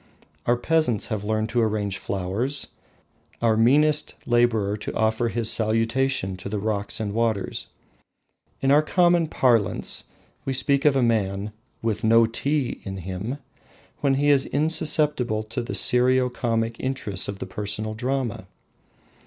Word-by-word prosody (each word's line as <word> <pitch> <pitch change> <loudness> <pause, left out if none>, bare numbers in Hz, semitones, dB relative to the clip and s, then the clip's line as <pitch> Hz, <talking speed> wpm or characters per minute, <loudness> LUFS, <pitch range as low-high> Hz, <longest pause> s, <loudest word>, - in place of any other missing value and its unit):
Our 120 - +4
peasants 125 -5 +1
have 105 -2 -3
learned 110 +1 -1
to 120 +2 +1
arrange 105 -3 -1
flowers, 100 +9 -2 0.7
our 115 -2 +2
meanest 150 +6 +3
labourer 115 -4 +2
to 105 - -6
offer 110 +2 +1
his 115 -1 -1
salutation 115 -1 +1
to 95 - -7
the 105 - -2
rocks 100 -1 -2
and 105 -2 -3
waters. 115 -3 -1 0.9
In 135 - +2
our 145 +2 +6
common 175 +1 +3
parlance 120 -9 +1 0.4
we 135 - -2
speak 140 +2 +1
of 145 -2 +5
the 135 - +3
man 105 -3 0 0.3
"with 110 0 -1
no 115 +1 +5
tea" 135 +4 -1
in 95 -1 -6
him, 95 +8 -5 0.6
when 140 -2 +2
he 145 +2 +2
is 140 -1 +3
insusceptible 150 -6 +1
to 115 +4 -4
the 120 - -5
serio 125 +1 +3
comic 115 -2 -1
interests 120 -7 -2
of 100 - -5
the - - -5
personal 105 +3 -4
drama. 125 -4 -3
115 Hz, 145 wpm, -24 LUFS, 105-135 Hz, 0.9 s, our